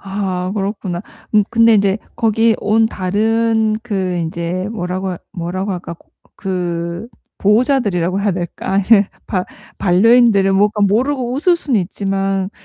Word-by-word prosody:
아 190 -2 -3
그렇구나. 195 -3 -3 0.3
음 210 -1 +5
근데 230 -1 +5
인제 200 0 +2 0.2
거기 225 0 +2
온 220 +2 +2
다른 220 +2 0
그 190 -6 -2
인제 170 +3 -3
뭐라고 185 -2 -3 0.2
뭐라고 185 +3 -3
할까 175 -2 -6 0.4
그 175 0 -3 0.3
보호자들이라고 205 -5 +1
해야 205 0 +1
될까 175 +1 -5
아니 195 +1 +2 0.4
바 185 -2 -1 0.3
반려인들을 200 +1 +4
뭐 195 +2 +4
약간 210 -1 0
모르고 245 +4 0
웃을 345 +6 +2
수는 265 -10 0
있지만 195 +1 -2
195 Hz, 280 characters per minute, -17 LUFS, 185-225 Hz, 0.4 s, 음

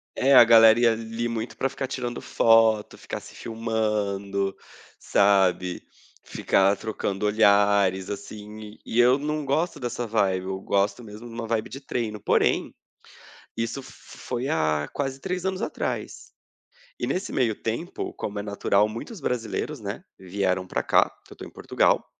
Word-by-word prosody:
É, 135 +1 +4
a 120 - +11
galera 115 0 +7
ia 120 -1 +5
a - - +1
ali 115 +1 -4
muito 115 0 -4
pra 135 - +1
ficar 135 0 -4
tirando 120 -2 -4
foto, 115 -2 +3
ficar - - -6
se - - -14
filmando, 105 -4 -2 0.4
sabe, 95 -3 +2 0.4
ficar 95 +1 +2
trocando 105 -2 -3
olhares, 100 -3 +3
assim, 105 +1 -9
e 115 - -1
eu 125 +2 +6
não 150 +1 -2
gosto 150 +3 -1
dessa 120 -1 -3
vibe, 95 -4 +1
eu 95 0 -4
gosto 100 +4 0
mesmo 110 +2 -10
de 115 - -11
uma 115 0 -5
vibe 110 -1 -1
de 135 - -8
treino. 115 -5 -3
Porém, - - +1 0.8
isso 115 +4 -3
f 130 - -13 0.3
foi 125 +1 -4
há 75 - 0
quase 135 -1 -3
3 180 +2 -4
anos 190 0 -2
atrás - - -4 0.7
e - - -2
nesse 190 +2 -2
meio 115 -4 +1
tempo, 115 - -4
como 105 0 -5
é 100 - -4
natural 100 0 +1
muitos 115 - -8
brasileiros, 120 -4 -3
né, - - -6 0.2
vieram 95 0 -1
pra - - -2
cá, - - +4 0.2
que - - -13
eu - - -21
tô - - -9
em - - -8
Portugal, - - +1
110 Hz, 160 wpm, -25 LUFS, 100-120 Hz, 0.8 s, a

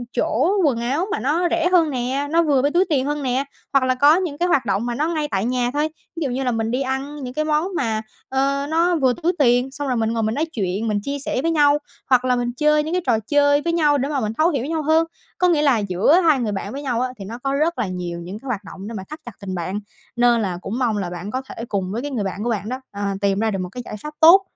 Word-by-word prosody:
chỗ 255 +6 +1
quần 270 -7 +2
áo 275 +9 0
mà 425 - -1
nó 325 +6 +1
rẻ 340 +1 +1
hơn 340 -4 +4
nè, 265 +2 -2
nó 335 +1 +4
vừa 285 -5 +3
với 285 +2 +1
túi 355 +4 +3
tiền 270 -4 +1
hơn 295 0 -2
nè, 260 +1 0 0.3
hoặc 275 -1 +4
là 255 0 +2
có 285 +4 +6
những 345 -5 -2
cái 350 - +1
hoạt 275 -8 +2
động 205 +1 0
mà 240 -1 -2
nó 300 +5 0
ngay 310 -3 -1
tại 195 0 0
nhà 245 0 0
thôi, 300 +2 0 0.3
ví 330 - -3
dụ 275 - -1
như 255 +2 -2
là 250 - +1
mình 225 -1 -1
đi 255 +2 0
ăn 270 +2 -3
những 250 -1 -5
cái 305 +3 -1
món 305 +3 +1
mà, 225 -7 0 0.3
ơ, 275 +1 0
nó 340 +2 +2
vừa 265 -5 +3
túi 350 +2 +2
tiền 250 -1 +3
xong 285 +1 -4
rồi 250 - 0
mình 225 0 0
ngồi 225 -1 0
mình 220 +1 0
nói 310 - +1
chuyện, 205 - -2
mình 210 -1 +1
chia 280 +3 -3
sẻ 265 -2 -2
với 330 +3 +1
nhau 295 -2 +4 0.3
hoặc 255 -1 +4
là 250 -1 +3
mình 245 0 -1
chơi 300 +1 +3
những 315 +2 -4
cái 365 - +1
trò 235 -4 +2
chơi 285 0 +4
với 335 +2 -1
nhau 300 -3 +3
để 275 +1 -1
mà 290 -2 0
mình 215 -3 -2
thấu 320 +3 +4
hiểu 275 -7 -1
với 280 - -4
nhau 320 -1 -1
hơn. 315 +2 +3 0.3
Có 360 - +3
nghĩa 330 -4 +3
là 280 -5 +4
giữa 200 - +3
hai 305 -4 +4
người 225 -4 -1
bạn 200 0 -4
với 280 - -5
nhau 250 -4 -1
á 255 - 0
thì 195 - -6
nó 230 +4 -6
có 275 0 0
rất 310 +4 0
là 205 - 0
nhiều 175 -2 -4
những 180 +5 -7
cái 275 - -12
hoạt 215 -5 -2
động 195 +1 -9
để 230 - -6
mà 190 - -6
thắt 305 - -7
chặt 240 - -7
tình 190 -2 -4
bạn 185 +4 -3 0.4
nên 240 -1 +4
là 185 -4 -2
cũng 225 +7 -4
mong 235 -5 +1
là 190 -3 -2
bạn 175 +4 -6
có 260 - -2
thể 230 - -6
cùng 190 -2 -2
với 225 +4 -2
cái 290 +2 -5
người 235 -6 -1
bạn 195 +1 -4
của 240 - -1
bạn 210 -2 -2
đó, 255 +1 -4
ờ, 200 - -7 0.2
tìm 200 -1 +1
ra 220 0 +1
được 195 - -2
một 180 - -4
cái 250 - -6
giải - - -6
pháp 300 0 -6
tốt 335 +5 +8
260 Hz, 305 wpm, -21 LUFS, 225-300 Hz, 0.4 s, tốt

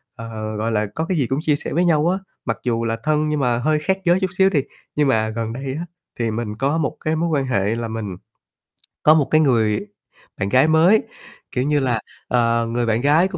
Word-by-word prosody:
ờ, 110 -2 -6
gọi 110 +2 -1
là, 105 -1 +1
có 160 - -1
cái 180 +1 -1
gì 135 -5 +1
cũng 135 +3 -1
chia 155 -2 +2
sẻ - - -4
với 175 +3 +2
nhau 160 -2 +3
á, 185 - +1 0.3
mặc 115 - -1
dù 115 -2 0
là 115 0 -1
thân 155 0 +1
nhưng 150 -1 0
mà 125 -3 +1
hơi 155 +5 +1
khác 190 +5 0
giới 175 +1 +4
chút 190 -1 0
xíu 190 0 +5
đi. 170 -7 +2 0.4
Nhưng 150 -1 +2
mà 110 -4 +2
gần 115 0 -3
đây 135 +1 -4
á 170 - -4 0.3
thì 115 -2 0
mình 110 -1 -3
có 140 +7 0
một 155 -3 -2
cái 155 +1 +1
mối 170 +2 0
quan 145 -4 +1
hệ 105 -4 0
là 115 0 -3
mình 110 -5 -5 0.9
có 155 - +7
một 150 -4 +2
cái 155 - +5
người 115 - +2 0.5
bạn 100 -1 -1
gái 130 +7 +4
mới, 165 +7 +5 0.5
kiểu 125 - -1
như 145 +1 +2
là, 125 -4 0 0.3
ờ, 115 -1 +2
người 120 +1 -1
bạn 115 +1 +1
gái 155 +6 +4
của 190 - -6
135 Hz, 240 wpm, -21 LUFS, 115-155 Hz, 0.9 s, có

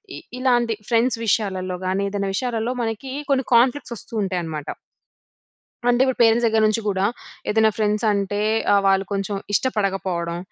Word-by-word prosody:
ఇ - - -7 0.2
ఇలాంటి 240 -3 +2 0.2
ఫ్రెండ్స్ 235 0 +2
విషయాలల్లో 190 -4 0
గాని, 190 +2 0
ఏదేనా 200 -1 -2
విషయాలల్లో, 235 +1 -1
మనకి 230 +4 -4 0.2
కొన్ని 265 -2 +2
కాన్ఫ్లిక్ట్స్ 250 +1 +2
వస్తూ 230 - -13
ఉంటాయనమాట... 165 -6 -4 1.1
అంటే, 245 +1 +3
ఇప్పుడు 260 - -1
పేరెంట్స్ 230 +1 +4
దగ్గర 220 -1 +2
నుంచి 215 +1 0
కూడా, 195 -1 +1 0.4
ఏదేనా 220 0 +4
ఫ్రెండ్స్ 210 +1 0
అంటే, 205 0 -1 0.3
ఆహ్, 200 - +4
వాళ్ళు 195 0 +3
కొంచెం 200 +1 -2 0.2
ఇష్టపడకపోవడం. 190 -7 -1
210 Hz, 145 wpm, -22 LUFS, 195-235 Hz, 1.1 s, పేరెంట్స్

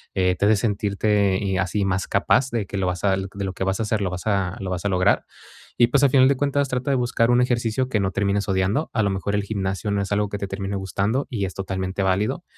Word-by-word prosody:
eh, 90 -1 +2
te 100 - 0
hace 110 +1 +5
sentirte 100 -2 +1
y 95 -2 -1
así, 95 +2 0
más 95 -1 -1
capaz 130 +1 +2
de 115 -4 -2
que 100 - -6
lo 95 -1 0
vas 90 +1 -3
a 100 - +3
de 95 +1 -5
lo 95 - -4
que 95 - -4
vas 95 +2 -1
a - - 0
hacer, 105 -1 -1
lo 95 - 0
vas 90 +2 -6
a 100 -3 0
lo 95 -1 -4
vas 90 +2 -4
a - - +2
lograr. 90 +2 +2 0.5
Y 120 - +6
pues, 140 +3 +2
a 140 - +6
final 130 0 +5
de 140 - +3
cuentas, 140 0 0
trata 125 +1 -2
de 135 - +3
buscar 120 -1 +1
un 120 - +4
ejercicio 120 0 0
que 115 -5 0
no 95 -1 +1
termines 100 +1 0
odiando. 95 +10 0
A 110 -2 +1
lo 100 - +1
mejor, 95 +1 -2
el 100 - 0
gimnasio 100 0 -3
no 100 0 0
es 100 - -5
algo 105 0 +1
que 100 0 -5
te 100 - -3
termine 95 +1 -4
gustando, 100 +7 -1
y 105 -6 -2
es 95 - -5
totalmente 95 0 -3
válido. 95 +3 0
100 Hz, 270 wpm, -23 LUFS, 95-115 Hz, 0.5 s, Y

